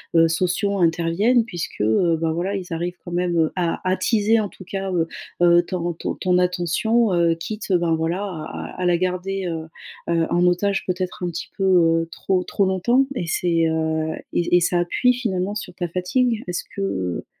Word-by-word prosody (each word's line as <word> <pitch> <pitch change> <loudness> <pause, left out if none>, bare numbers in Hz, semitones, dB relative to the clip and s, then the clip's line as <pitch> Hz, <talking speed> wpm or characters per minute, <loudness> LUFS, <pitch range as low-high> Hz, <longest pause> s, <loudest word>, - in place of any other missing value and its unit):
heu, 165 0 +6
sociaux 185 +4 0
interviennent. 175 +8 +2
Puisque, 175 -8 -6
heu, 160 - +3
bah, 165 -1 +1
voilà 180 +5 -2
ils 185 -3 -5
arrivent 175 +2 -3
quand 175 - -7
même, 175 -1 0
heu, 160 -1 +2
à 175 -3 -1
attiser 215 +3 +2
en 205 - -3
tout 185 - -14
cas, 195 +1 -4
heu 170 -3 +1 0.3
heu, 175 0 +6
ton 185 - -4 0.2
ton 160 - -4
-ton 180 -1 +4
attention, 180 +5 +1
heu, 170 -1 +3
quitte 210 +5 -6
ben 170 -2 +2
voilà 165 +4 -1
à 175 -6 -6
à - - -3
à - - 0
la 175 -1 +3
garder, 185 +2 -2
heu 165 -1 -4 0.5
heu, 165 -1 +2
en 175 +1 +2
otage 195 +3 +1
peut-être 180 0 -3
un - - 0
petit 170 0 -5
peu, 195 - -1
heu, 165 -3 +3
trop, 185 +1 0
trop 200 - 0
longtemps 215 +8 +2
et 175 -8 -3
c'est, 165 -1 +1
heu 160 0 0 0.2
et 175 0 +3
et - - +5
ça 175 0 +1
appuie 250 +8 +2
finalement 205 -5 -2
sur 195 -3 -6
ta 175 0 -3
fatigue. 215 +7 0
Est-ce 180 0 -3
que 200 - -3
heu 95 - -2
180 Hz, 200 wpm, -22 LUFS, 165-195 Hz, 0.5 s, heu